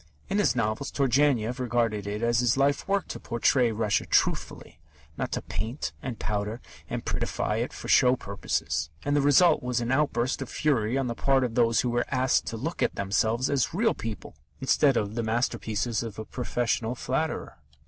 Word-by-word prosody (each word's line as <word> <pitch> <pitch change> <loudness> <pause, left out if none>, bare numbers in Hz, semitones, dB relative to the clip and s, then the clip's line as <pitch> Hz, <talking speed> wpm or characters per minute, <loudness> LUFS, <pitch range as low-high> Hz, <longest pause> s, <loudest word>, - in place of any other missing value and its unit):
In 200 - +1
his 205 - +2
novels, 115 +3 -1
Turgenev 130 -3 +2
regarded 115 -4 0
it 105 +2 -3
as 120 0 +2
his 120 0 +2
life 140 +1 +1
work 200 0 0
to - - -5
portray 120 +1 +2
Russia 105 -1 0
truthfully, - - 0 0.4
not - - -3
to - - -2
paint 115 +6 -4
and 125 -4 -5
powder 105 +2 -3 0.3
and - - -4
"prettify" - - -1
it - - -2
for - - -8
show 125 0 +5
purposes, 100 - -2 0.2
and 145 0 +1
the 145 - +3
result 150 +4 +5
was 125 -1 -1
an 120 +1 -2
outburst 130 -2 +1
of - - -5
fury 130 -5 +1
on 135 - 0
the 120 - -2
part 135 +2 +2
of 120 -3 -2
those 115 -2 +3
who 125 - -1
were 120 0 0
asked 130 -1 +1
to 115 - -3
look 160 +9 -4
at - - +1
themselves 110 +5 +1
as 140 +2 0
real 225 +3 +2
people 110 -2 -7 0.3
instead 135 0 +3
of 105 - 0
as 110 - -10
the 120 - 0
master 115 +3 0
pieces 110 +1 -1
of 115 -3 -6
a 110 - -5
professional 120 0 -1
flatterer. 135 - -3
120 Hz, 195 wpm, -27 LUFS, 110-135 Hz, 0.4 s, show